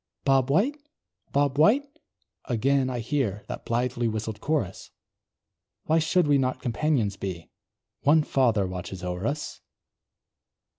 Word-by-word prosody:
"Bob 135 -1 +3
White! 215 - +2 0.5
Bob 140 0 +1
White!" 235 - +5 0.6
again 130 +2 +1
I 125 -2 -3
hear 110 -5 -1
That - - -7
blithely 120 0 0
whistled 110 -1 -4
chorus, 140 - -2 0.9
Why 160 +1 +2
should 175 +2 +2
we 145 -1 +4
not 130 -1 0
companions 120 -4 0
be? 90 -4 -6 0.5
One 155 +2 +4
Father 115 -9 +2
watches 90 0 -6
o'er 90 +3 -2
us! 150 +1 -4
130 Hz, 120 wpm, -26 LUFS, 105-145 Hz, 0.9 s, White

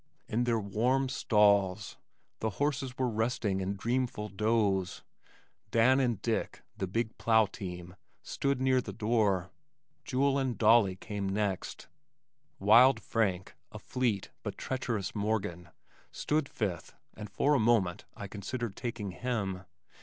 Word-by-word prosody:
In 120 +2 0
their 115 -2 +1
warm 120 +7 0
stalls 105 -5 +2 0.4
the 110 - -1
horses 135 -3 -1
were 130 - +1
resting 110 -4 -1
in 95 +2 -2
dreamful 120 0 -2
doze. 100 -3 0 0.7
Dan 125 +4 +4
and 120 -6 +1
Dick, 115 -2 -2
the 95 - -3
big 115 +4 -2
plow 110 -1 +4
team, 90 -3 -8 0.3
stood 140 -2 -1
near 130 -1 +3
the 105 -5 -7
door. 105 -4 +1 0.5
Jule 135 +1 +1
and 130 -3 -1
Dolly 110 -4 +5
came 100 0 -4
next. 100 -1 -3 0.7
Wild 115 +5 +6
Frank, 95 -6 -1 0.2
a - - -8
fleet 120 -7 -2
but - - -6
treacherous 115 -7 -3
Morgan, 100 -5 -2 0.4
stood 150 -2 -1
fifth 95 -7 -4 0.2
and 105 -1 -8
for 140 +10 +2
a 140 - +3
moment 110 -6 +2
I 100 - -7
considered 110 +2 -5
taking 115 -5 -4
him. 95 -4 -3
110 Hz, 130 wpm, -30 LUFS, 100-125 Hz, 0.7 s, Wild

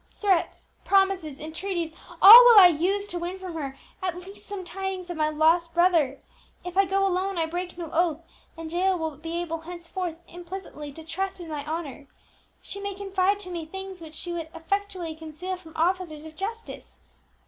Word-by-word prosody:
Threats, 385 -5 0
promises, 385 -7 +1
entreaties, 330 +1 -4 0.3
all 450 +6 +13
will 475 -3 +9
I 365 -2 +10
use 370 +5 0
to 355 -4 -4
win 350 +2 -4
from 375 -2 -7
her 275 -4 -5 0.2
at 365 -2 -2
least 380 +3 -12
some 405 -2 -5
tidings 375 0 -5
of 345 - -6
my 305 -1 +2
lost 325 +2 +2
brother! 335 -6 +3 0.5
If 360 0 -6
I 390 +1 +5
go 390 +1 +1
alone 380 0 -1
I 330 - +1
break 350 +2 -5
no 335 -3 -6
oath, 335 -1 +1 0.3
and 325 -1 -7
Jael 370 +2 +1
will 320 -3 -3
be 330 +3 -5
able 330 -1 -4
henceforth 345 0 -6
implicitly 345 -4 -8
to 320 - -11
trust 380 +4 -4
in 340 -2 -8
my 295 -2 -4
honour. 305 -3 -5 0.6
She 400 - -7
may 400 -1 -4
confide 390 0 0
to 365 -2 -7
me 340 -2 -4
things 385 +1 -8
which 315 -1 -10
she 345 +2 -5
would 330 -2 -5
effectually 370 0 -3
conceal 320 +4 -6
from 335 -3 -14
officers 330 -2 -1
of 315 0 -11
justice. 450 +6 -7
350 Hz, 185 wpm, -26 LUFS, 320-385 Hz, 0.6 s, all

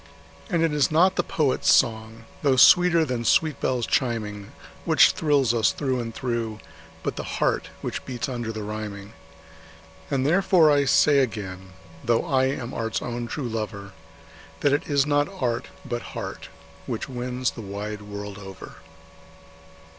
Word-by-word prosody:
And 170 -1 +1
it 165 -2 +1
is 150 -2 +2
not 180 +5 +4
the - - +2
poet's 145 -5 +1
song, 110 0 +1 0.2
though 140 -2 +3
sweeter 170 +4 +6
than 125 -4 -3
sweet 155 +5 +2
bells 125 -3 0
chiming, 105 -5 -2 0.3
Which - - +5
thrills 140 -6 +2
us 115 -2 +3
through 130 -3 -2
and 115 -1 -4
through, 115 -3 -3 0.4
but - - -3
the - - -3
heart - - 0
which - - -4
beats 125 0 -4
under 120 -4 -4
the 110 -1 -6
rhyming. 105 -1 -6 1.0
And 135 -1 0
therefore 175 -1 +4
I 145 -1 +3
say 140 +1 +4
again, 95 -7 -3 0.3
though 115 0 +1
I 130 -1 +2
am 130 -2 -3
art's 115 -1 -2
own 120 -1 -4
true 130 +2 -4
lover, 105 -3 -5 0.7
That 145 - +3
it 145 - 0
is 140 -1 +3
not 145 +1 +1
art, 120 -2 -1 0.2
but 120 -3 -3 0.2
heart, - - -6 0.4
which 115 - -3
wins 125 0 -2
the 115 - -9
wide 105 +1 -6
world 100 -1 -7
over. 95 -2 -11
120 Hz, 155 wpm, -24 LUFS, 110-140 Hz, 1.0 s, sweeter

